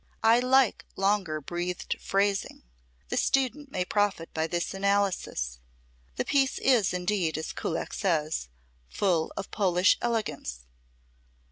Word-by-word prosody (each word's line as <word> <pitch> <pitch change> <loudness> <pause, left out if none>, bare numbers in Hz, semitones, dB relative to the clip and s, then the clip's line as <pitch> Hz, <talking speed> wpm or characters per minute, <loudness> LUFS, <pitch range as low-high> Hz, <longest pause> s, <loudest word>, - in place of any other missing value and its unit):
I 225 +2 +6
like 255 -1 +3
longer 195 -5 +1
breathed 175 +4 -3
phrasing. 195 0 0 0.5
The - - -1
student 270 +2 +1
may 180 -6 -1
profit 205 -4 0
by 160 0 0
this 170 +2 -2
analysis. 195 - 0 0.6
The - - -1
piece 270 -2 +2
is 245 -7 +3
indeed, 180 -2 0
as 155 - -4
Kullak 165 - -3
says, 155 - 0 0.4
"full 175 -5 +1
of 195 - -5
Polish 185 -2 +3
elegance." 220 - -2
195 Hz, 120 wpm, -28 LUFS, 165-210 Hz, 0.6 s, I